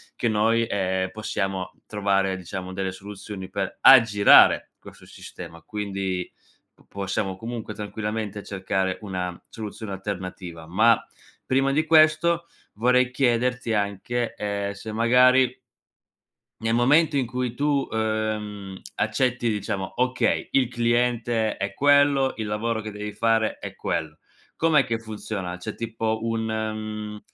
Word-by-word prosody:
che 120 - -1
noi, 115 +1 +2
ehm, 95 -1 -1
possiamo 95 -3 -3
trovare, 100 -2 0
diciamo, 95 +1 -6
delle 95 0 -2
soluzioni 100 0 -8
per 100 -2 -3
aggirare 115 -6 +7
questo - - -14
sistema, 85 0 -11
quindi, 95 -1 -4 0.6
possiamo 95 -1 -3
comunque 115 0 -6
tranquillamente 105 0 -4
cercare 95 -1 -2
una 90 -3 -4
soluzione 110 -1 -7
alternativa. 90 -4 -6
Ma, 110 +7 +4 0.5
prima 135 +1 +2
di 155 +3 +1
questo 160 +2 +4 0.3
vorrei 125 +3 +2
chiederti 125 -2 +1
anche, 105 +4 -1
ehm, 100 -1 -3
se 100 +2 -8
magari 125 +3 +4 1.1
nel 115 +1 +1
momento 145 +5 +4
in 135 - +1
cui 125 0 -3
tu, 140 -1 +1
ehm, 110 -3 -3 0.2
accetti, 120 +3 0
diciamo: 100 -2 -3
okay, 125 0 0
il 135 -3 +3
cliente 120 -1 0
è 100 - -3
quello, 145 -1 +4
il 110 - -3
lavoro 110 +2 -2
che 110 0 -6
devi 105 0 -6
fare 115 +1 +1
è - - -7
quello. 80 -1 -3 0.4
Com'è 155 -4 +3
che 115 -1 -2
funziona? 105 -5 -5
C'è 90 - -6
tipo 115 -1 -2
un, 115 0 -1
mhmm, 110 -1 -4
110 Hz, 125 wpm, -24 LUFS, 100-120 Hz, 1.1 s, aggirare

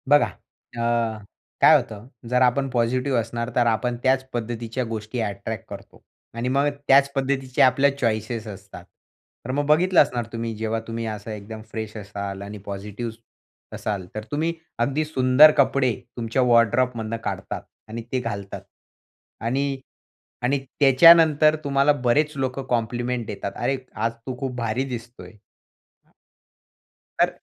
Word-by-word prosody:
बघा 145 0 +6 0.5
अ, 115 -1 0 0.4
काय - - +8
होतं, 110 +2 -2 0.2
जर 125 0 +2
आपण 130 +2 +2
पॉझिटिव्ह 125 +1 +1
असणार, 115 +1 -3
तर 120 - +3
आपण 115 +2 0
त्याच 130 0 +3
पद्धतीच्या 120 +1 -3
गोष्टी 110 +2 -4
अट्रॅक्ट 100 0 -4
करतो - - -11 0.3
आणि 115 +2 -3
मग 140 +2 +2 0.2
त्याच 140 +1 +5
पद्धतीचे 135 -1 0
आपल्या 135 +2 +5
चॉईसेस 115 -2 -2
असतात. 95 -3 -10 0.6
तर 130 - -3
मग 145 +2 0
बघितलं 175 +5 +5
असणार 125 -5 0
तुम्ही, 115 0 -3
जेव्हा 110 +1 -2
तुम्ही 115 0 -4
असं 110 0 -5
एकदम 110 +1 -8
फ्रेश 110 -1 -5
असाल 100 -1 -6
आणि 100 +1 -7
पॉझिटिव्ह 105 +4 -5 0.6
असाल, 100 -4 -3
तर 110 - -4
तुम्ही 160 +3 0 0.3
अगदी 140 +6 0
सुंदर 140 0 +6
कपडे 130 -2 +3 0.2
तुमच्या 115 +2 0
वॉर्डरोब 120 +1 +4
मधून 115 0 -3
काढतात - - -4 0.3
आणि 115 +2 -5
ते 130 - +1
घालतात 100 -5 -5 0.8
आणि 135 +3 -1 0.6
आणि 135 +3 +2 0.2
त्याच्यानंतर 155 +2 +7
तुम्हाला 140 0 +3
बरेच 150 +5 +3
लोकं 135 0 -2
कॉम्प्लिमेंट 120 0 -1
देतात. 100 -1 -5
अरे! 135 - -1 0.2
आज 115 +2 0 0.2
तू 130 -1 -4
खूप 130 -2 -3
भारी 115 +1 -1
दिसतोय! 120 0 -8 1.9
तर - - +5
120 Hz, 140 wpm, -23 LUFS, 110-135 Hz, 1.9 s, काय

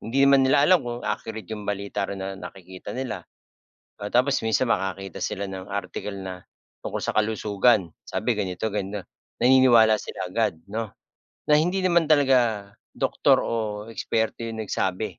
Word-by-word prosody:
Hindi 135 +5 +2
naman 140 0 +6
nila 140 +2 +5
alam 180 +2 +5
kung 120 -2 -6
accurate 110 -1 -4
'yung 105 -2 -6
balita 100 -1 -2
rin 100 - -4
na 95 - -4
nakikita 95 0 -9
nila. 130 -3 -3 0.8
O 100 0 -6
tapos 130 +3 +3
minsan 110 +3 +1
makakita 95 -3 -2
sila 100 +1 -3
ng 95 -1 -8
article 100 0 -4
na 95 -1 -7 0.4
tungkol - - -3
sa - - -3
kalusugan. 105 -3 +2
Sabi 115 +1 -1
ganito 95 0 -2 0.7
naniniwala 120 -4 +6
sila - - -5
agad 80 - -1
'no, 110 +1 -4 0.6
na - - +7
hindi 180 +5 +1
naman 175 -3 +3
talaga 125 -9 +3 0.2
doktor - - +2
o - - -2 0.4
eksperto 115 +1 -2
'yong 110 -1 -4
nagsabi 95 0 -2
110 Hz, 150 wpm, -25 LUFS, 100-125 Hz, 0.8 s, na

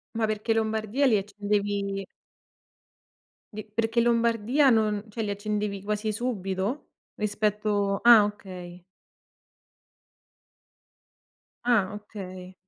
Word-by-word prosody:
Ma 225 -1 +1
perché 215 +1 0
Lombardia 220 +4 +1
li 220 -4 +4
accendevi 200 -1 -2 1.5
Di 215 0 -6
perché 225 +2 0
in 235 - +3
Lombardia 235 +4 +3
non 215 -2 +1
cioè 225 +2 -5
li 210 - -2
accendevi 205 -1 -3
quasi 210 +1 -1
subito, 205 0 -3 0.3
rispetto 210 -1 0
ah 235 -3 +8
okay. 180 -4 -7 2.8
Ah 210 -5 +2
okay. 185 -3 -9
210 Hz, 95 wpm, -27 LUFS, 200-225 Hz, 2.8 s, ah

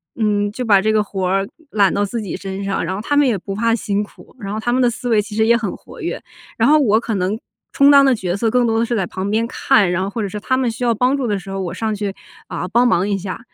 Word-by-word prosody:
嗯， 205 -2 +1
就 250 +4 -4
把 200 -4 +5
这 215 - +1
个 215 - +3
活 190 -2 -3
儿 195 +1 +1 0.2
揽 200 -5 +2
到 200 - +1
自 230 +3 -4
己 200 - -5
身 195 0 -6
上。 195 0 -1
然 190 - -2
后 200 - -4
他 290 +6 0
们 290 -1 +5
也 225 -5 +1
不 195 +2 -6
怕 230 +3 +1
辛 205 -2 -1
苦， 210 - -12
然 200 -3 -6
后 215 - -3
他 240 +2 -1
们 255 - +2
的 245 - +4
思 245 +1 -5
维 220 -3 +4
其 210 0 -9
实 220 0 +3
也 235 +1 +5
很 220 -4 -2
活 - - -13
跃， - - -4 0.3
然 - - +3
后 305 +2 +6
我 220 -7 +3
可 230 - -4
能 195 +3 -1 0.4
充 280 +1 +6
当 280 -1 +7
的 265 - +4
角 185 -4 -3
色 225 +1 +1
更 250 +1 +2
多 225 -1 +1
的 230 - +2
是 235 - -2
在 195 -5 0
旁 190 +3 -4
边 220 +2 +1
看， 210 -4 +2
然 180 +1 0
后 190 - -2
或 225 +3 -4
者 200 - -2
是 210 - -5
他 260 +5 0
们 255 -3 0
需 225 - -6
要 235 -1 +2
帮 250 +5 +2
助 265 -3 -2
的 205 -2 0
时 195 +1 -9
候， 195 - -4
我 180 -2 -4
上 220 +3 -2
去， 200 -1 -4 0.3
啊， 180 - -4
帮 240 +5 +3
忙 190 -4 +2
一 200 -1 0
下。 190 0 -6
210 Hz, 330 characters per minute, -19 LUFS, 195-235 Hz, 0.4 s, 当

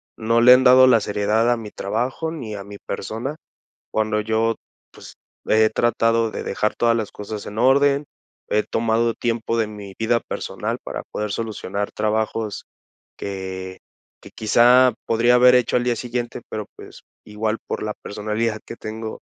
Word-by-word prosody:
no 115 +1 +1
le 125 +1 +9
han 130 +1 +5
dado 130 0 +8
la 125 -3 +5
seriedad 105 +3 +1
a 120 - +2
mi 110 -2 -8
trabajo 125 +10 -2
ni 120 -10 -6
a 100 - -6
mi 100 +1 -10
persona. 115 +9 -5 0.6
Cuando 110 0 0
yo, 110 +1 0 0.4
pues, - - -13 0.3
he 110 0 +4
tratado 115 0 +1
de - - -5
dejar 105 +2 -1
todas 115 -1 +2
las 110 -3 -3
cosas 105 0 -7
en 105 +2 -6
orden, 140 +3 +4 0.4
he 105 0 +2
tomado 115 +1 0
tiempo 115 -1 -2
de 110 -2 +1
mi 105 -2 -9
vida 115 +1 +2
personal - - -4
para - - -5
poder 105 -1 -3
solucionar 105 -2 -4
trabajos 110 0 -2 0.5
que, 95 -1 -6 0.4
que - - -14
quizá 120 +3 +5
podría 120 +2 +3
haber 125 0 +7
hecho 125 -1 +2
al 120 - 0
día 120 -1 +1
siguiente. 120 0 -4
Pero, 105 -1 -4
pues, - - -13 0.2
igual, 110 +1 -3
por - - -3
la 105 0 -3
personalidad 105 +2 -3
que - - -8
tengo, 110 0 -7
110 Hz, 165 wpm, -22 LUFS, 105-120 Hz, 0.6 s, le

